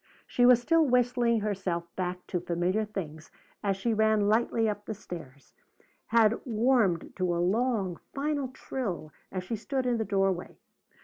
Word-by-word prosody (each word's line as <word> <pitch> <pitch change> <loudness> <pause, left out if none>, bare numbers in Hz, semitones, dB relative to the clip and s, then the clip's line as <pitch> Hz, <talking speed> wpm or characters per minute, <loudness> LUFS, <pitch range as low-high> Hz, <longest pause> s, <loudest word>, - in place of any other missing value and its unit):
She 245 0 +3
was 250 -1 +7
still 325 +6 +3
whistling 245 -2 +2
herself 195 -5 -2
back 180 -1 -3
to 180 - -2
familiar 175 +5 0
things 160 -7 -7 0.3
as 195 -2 +1
she 225 +4 0
ran 220 0 +3
lightly 225 +1 +2
up 205 -1 -3
the 220 - -3
stairs; 160 -9 -10 0.5
had 225 -1 +3
warmed 225 - +1
to 180 -2 0
a - - 0
long 195 0 0 0.2
final 285 -1 -1
trill 230 -11 -5 0.2
as 185 -1 -3
she 205 +5 -3
stood 260 +4 -2
in 245 -1 +1
the 220 - 0
doorway. 195 -3 -1
210 Hz, 160 wpm, -29 LUFS, 180-240 Hz, 0.5 s, was